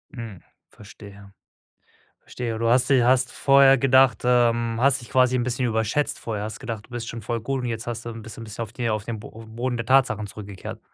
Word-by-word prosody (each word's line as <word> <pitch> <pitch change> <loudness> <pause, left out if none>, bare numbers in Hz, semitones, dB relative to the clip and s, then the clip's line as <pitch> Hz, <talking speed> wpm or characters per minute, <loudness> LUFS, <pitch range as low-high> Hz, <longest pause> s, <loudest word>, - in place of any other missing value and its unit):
Hm, 115 -7 -8 0.3
verstehe, 100 -1 -14 0.9
verstehe. 115 -3 -5
Du 115 - 0
hast 125 +2 +4
sie 130 -3 +4
hast 125 0 +3
vorher 135 +1 +5
gedacht, 130 -3 +4
ähm 120 -2 +2
hast 135 0 +3
dich 120 - -13
quasi 130 -1 +3
'n 120 - 0
bisschen 125 0 -1
überschätzt 110 +5 -1
vorher, 105 -3 -4
hast 110 +1 -6
gedacht, 115 -5 -6
du - - -29
bist 120 -2 -6
schon 115 -1 -6
voll 115 +3 -3
gut 135 +3 -3
und - - -4
jetzt 115 +1 -4
hast 115 -1 -5
du - - -4
'n 115 -1 -8
bisschen 110 +1 -9
bist 110 0 -10
auf 115 -1 -5
die 120 -3 -2
auf 105 -1 -2
den 115 -2 -5
Boden 115 +3 -5
der 115 - -4
Tatsachen 115 -5 +2
zurückgekehrt? 100 -2 -9
115 Hz, 215 wpm, -24 LUFS, 110-125 Hz, 0.9 s, vorher